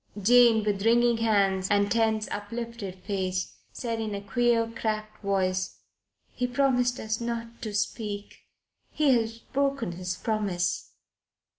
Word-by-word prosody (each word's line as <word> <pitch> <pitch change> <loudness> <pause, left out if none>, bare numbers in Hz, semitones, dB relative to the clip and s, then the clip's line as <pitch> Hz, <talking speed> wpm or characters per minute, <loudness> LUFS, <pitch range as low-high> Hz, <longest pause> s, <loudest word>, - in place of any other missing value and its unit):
Jane, 230 +1 +6
with 205 -2 -1
wringing 235 +1 +4
hands 200 -4 +2
and 200 0 +2
tense, 220 -2 +2
uplifted 230 -1 -5
face, 185 -2 -2 0.2
said 230 -2 -3
in 215 -2 -3
a - - -3
queer 235 +2 +2
cracked 215 -2 -4
voice: 185 -2 0 0.6
"He 250 - -1
promised 250 -1 +2
us 220 +1 -2
not 235 0 -4
to 215 - -4
speak. 210 -1 -3 0.5
He 300 -3 +2
has 230 -1 0
broken 275 -3 -1
his 180 +1 -4
promise." 195 -6 -1
220 Hz, 130 wpm, -27 LUFS, 200-235 Hz, 0.6 s, Jane